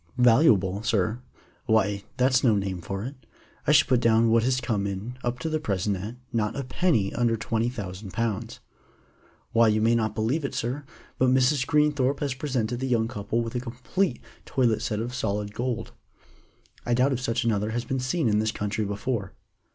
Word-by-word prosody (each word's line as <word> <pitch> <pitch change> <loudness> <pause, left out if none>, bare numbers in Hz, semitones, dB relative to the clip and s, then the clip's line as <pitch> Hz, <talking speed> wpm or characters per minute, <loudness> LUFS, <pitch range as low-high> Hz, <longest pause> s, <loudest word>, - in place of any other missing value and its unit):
"Valuable, 115 - +4
sir? 110 +1 0 0.5
Why, 105 -2 +2
that's 125 -1 +3
no 115 -5 +4
name 95 -3 -2
for 95 +3 -4
it. 135 - -5 0.5
I - - +5
should - - +6
put 125 -2 +3
down 115 -1 +4
what 115 0 +5
has 130 +2 +1
come 110 -5 -1
in 100 +5 -5
up 120 0 -1
to - - -2
the 155 0 0
present 100 -6 -1
at, 105 +6 -6 0.2
not 105 -2 0
a 140 - -3
penny 125 - +1
under 115 -1 +1
twenty 115 +1 -1
thousand 100 -4 -6
pounds. 110 -1 -3 0.9
Why, 115 0 +5
you 110 0 +3
may 115 +2 +3
not 110 -2 0
believe 120 +9 0
it, 140 - -3
sir, 130 +5 -3 0.3
but 130 - +4
Mrs. 130 +1 +3
Greenthorpe 150 -3 +2
has 140 -3 -1
presented 125 -4 -2
the 130 - -2
young 115 -3 +2
couple 110 0 -2
with 115 - -5
a 125 - -1
complete 125 +6 -2 0.2
toilet 120 -5 +1
set 105 - -2
of 120 +2 -4
solid 105 -4 -2
gold. 120 0 -3 0.9
I 120 - +1
doubt 130 +3 +3
if 130 - -2
such 120 -1 0
another 105 -2 0
has 120 +2 -2
been 130 - -2
seen 130 +4 0
in 105 -1 +3
this 110 0 +1
country 105 +1 -2
before." 100 0 -3
115 Hz, 190 wpm, -26 LUFS, 105-130 Hz, 0.9 s, should